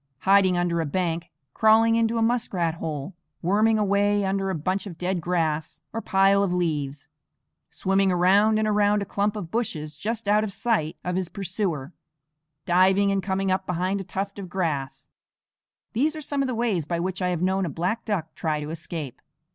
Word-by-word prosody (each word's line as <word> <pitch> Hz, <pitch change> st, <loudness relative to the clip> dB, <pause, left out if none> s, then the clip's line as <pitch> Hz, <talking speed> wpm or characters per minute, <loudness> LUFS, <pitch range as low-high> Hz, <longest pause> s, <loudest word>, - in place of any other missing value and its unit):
Hiding 190 Hz, -2 st, +4 dB
under 175 Hz, -1 st, +1 dB
a -, -, -1 dB
bank, 170 Hz, +1 st, -2 dB, 0.2 s
crawling 225 Hz, +1 st, +5 dB
into 230 Hz, 0 st, +2 dB
a 225 Hz, -, +2 dB
muskrat 220 Hz, -8 st, 0 dB
hole, 160 Hz, +1 st, -5 dB, 0.3 s
worming 215 Hz, +5 st, +3 dB
a 210 Hz, -, +1 dB
way 200 Hz, 0 st, +2 dB
under 195 Hz, 0 st, 0 dB
a 190 Hz, -, -1 dB
bunch 185 Hz, +6 st, -2 dB
of 170 Hz, -4 st, -9 dB
dead 180 Hz, 0 st, -1 dB
grass 160 Hz, -2 st, -1 dB
or 225 Hz, -, -3 dB
pile 195 Hz, 0 st, +3 dB
of 200 Hz, -3 st, +1 dB
leaves, 150 Hz, -5 st, -2 dB, 0.6 s
swimming 195 Hz, 0 st, +1 dB
around 195 Hz, +5 st, +4 dB
and 215 Hz, 0 st, +1 dB
around 205 Hz, -1 st, +2 dB
a -, -, -7 dB
clump 205 Hz, +2 st, -1 dB
of 180 Hz, -6 st, -6 dB
bushes 155 Hz, -10 st, -3 dB
just 220 Hz, +6 st, -4 dB
out 210 Hz, +1 st, +4 dB
of 215 Hz, -, -3 dB
sight 195 Hz, -8 st, -1 dB
of 180 Hz, 0 st, -2 dB
his 185 Hz, -2 st, -2 dB
pursuer, 175 Hz, -6 st, -3 dB, 0.7 s
diving 190 Hz, +3 st, +4 dB
and 195 Hz, -1 st, +1 dB
coming 190 Hz, 0 st, -1 dB
up 190 Hz, 0 st, -1 dB
behind 185 Hz, +3 st, -1 dB
a -, -, -5 dB
tuft 195 Hz, +2 st, -4 dB
of 190 Hz, -3 st, -7 dB
grass, 140 Hz, -7 st, -3 dB, 0.9 s
these 295 Hz, +7 st, +1 dB
are -, -, -5 dB
some 285 Hz, -1 st, -1 dB
of 270 Hz, -, 0 dB
the 255 Hz, -, -2 dB
ways 215 Hz, -10 st, 0 dB
by 170 Hz, 0 st, -1 dB
which 185 Hz, +2 st, -3 dB
I 180 Hz, -, +1 dB
have 175 Hz, -1 st, -1 dB
known 190 Hz, +1 st, +1 dB
a -, -, -3 dB
black 180 Hz, +9 st, -2 dB
duck 170 Hz, -7 st, -3 dB
try 155 Hz, -2 st, -1 dB
to 150 Hz, +1 st, -5 dB
escape. 160 Hz, -5 st, -6 dB
190 Hz, 195 wpm, -25 LUFS, 170-205 Hz, 0.9 s, crawling